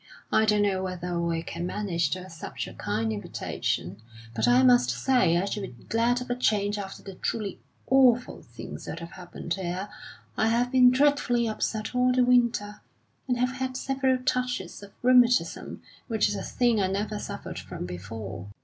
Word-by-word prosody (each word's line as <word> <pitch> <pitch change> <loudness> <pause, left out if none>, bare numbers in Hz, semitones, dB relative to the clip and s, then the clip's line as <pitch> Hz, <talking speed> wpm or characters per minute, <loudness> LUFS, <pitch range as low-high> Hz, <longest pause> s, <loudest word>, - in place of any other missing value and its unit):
I 220 - +4
don't 210 -1 +3
know 195 -2 +1
whether 180 -2 -3
we 165 -1 -1
can 170 +1 -4
manage 180 -6 -1
to 185 +4 -3
accept 165 -4 -6
your - - -9
kind 110 -1 -2
invitation, 100 -2 -3 0.3
but 115 0 +1
I 125 +2 +5
must 125 -1 +5
say 170 - +2
I 180 - +1
should 205 +1 -3
be 120 -11 -9
glad 235 +2 +1
of 250 - -5
a - - +1
change 210 -4 +1
after 195 -1 -7
the 195 - -8
truly 200 +1 -3 0.3
awful 250 -2 +3
things - - -9
that - - -5
have 170 0 -8
happened 175 -1 -6
here. 190 +1 -4 0.5
I 220 - +2
have 240 +2 +1
been 255 -1 +7
dreadfully 255 -3 +2
upset 215 0 -2
all 250 0 +3
the 250 0 +3
winter, 235 -4 +2 0.5
and 250 -1 +1
have 250 +1 +1
had 260 0 -3
several 265 -1 +1
touches 250 -8 -2
of 200 0 -12
rheumatism, 245 0 +3 0.2
which 220 -3 +2
is 205 - -2
a - - -4
thing 240 -4 +1
I 190 - +2
never 205 +2 -2
suffered - - -6
from - - -7
before. 95 +2 -7
205 Hz, 180 wpm, -27 LUFS, 170-245 Hz, 0.5 s, been